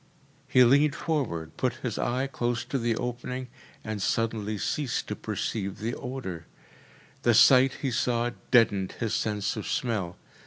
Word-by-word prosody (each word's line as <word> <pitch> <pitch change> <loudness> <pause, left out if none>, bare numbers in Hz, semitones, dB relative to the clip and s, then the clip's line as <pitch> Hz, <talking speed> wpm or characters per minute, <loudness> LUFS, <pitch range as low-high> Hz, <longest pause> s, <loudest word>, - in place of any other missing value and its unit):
He 130 -2 +6
leaned 140 +4 +4
forward, 85 - -2
put 130 - 0
his 120 -4 -2
eye 125 +2 0
close 120 -4 -2
to 135 - -2
the 115 -1 0
opening, 125 +1 -4 0.3
and 110 -2 -4
suddenly 110 0 -1
ceased 135 +6 -1
to - - -2
perceive 100 -3 -3
the 115 +3 -3
odour. 105 -11 -6 0.7
The 120 -2 +3
sight 130 +3 +7
he 135 - 0
saw 120 -1 0 0.2
deadened 100 -6 +3
his 115 -2 -3
sense 105 -2 -1
of - - -5
smell. 115 - -2
120 Hz, 150 wpm, -27 LUFS, 105-130 Hz, 0.7 s, sight